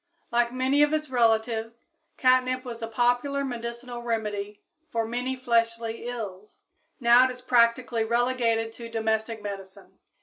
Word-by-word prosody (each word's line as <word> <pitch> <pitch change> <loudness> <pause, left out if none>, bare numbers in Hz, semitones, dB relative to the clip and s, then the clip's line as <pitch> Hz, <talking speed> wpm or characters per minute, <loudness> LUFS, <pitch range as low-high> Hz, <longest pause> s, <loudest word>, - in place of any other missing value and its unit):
Like 235 0 +2
many 260 +3 +2
of 295 +1 +4
its 305 -3 -1
relatives, 225 -1 +1 0.3
catnip 255 0 +3
was 235 -2 -7
a 225 - -3
popular 245 +5 +1
medicinal 240 0 -6
remedy 210 -3 -3 0.3
for 230 -1 -1
many 245 +3 -2
fleshly 230 -2 0
ills; 210 -5 -7 0.4
now 240 0 +6
it - - +1
is 250 0 -8
practically 235 -1 +3
relegated 235 -1 +1
to 230 0 -9
domestic 220 -1 -1
medicine. 195 -1 -9
235 Hz, 135 wpm, -26 LUFS, 225-250 Hz, 0.4 s, now